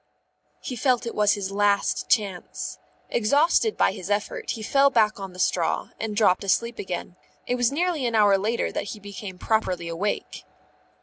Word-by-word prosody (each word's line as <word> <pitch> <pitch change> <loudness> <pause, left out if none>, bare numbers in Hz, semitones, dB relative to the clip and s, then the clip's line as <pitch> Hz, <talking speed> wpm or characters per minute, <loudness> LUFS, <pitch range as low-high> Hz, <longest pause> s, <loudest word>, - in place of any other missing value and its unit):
_ - - -45 0.6
He 255 - -5
felt 250 0 +1
it 230 - -4
was 210 -1 +3
his 195 -1 -3
last 200 0 +1
chance. 200 -6 -1 0.3
Exhausted 295 - +2
by - - +3
his 185 - -8
effort, 205 0 -2
he 220 - -3
fell 275 +5 +4
back 215 -5 +2
on 195 -1 -6
the - - -13
straw 180 -2 0
and 215 -1 -3
dropped 205 -4 +3
asleep 235 +4 0
again. 180 -1 -5 0.3
It - - -1
was 245 -1 +2
nearly 320 -3 0
an 230 - -1
hour 205 -2 +5
later 220 +4 -1
that - - -4
he - - -14
became 200 -2 -8
properly 185 -5 -1
awake. 175 +5 -3
210 Hz, 180 wpm, -25 LUFS, 195-240 Hz, 0.6 s, hour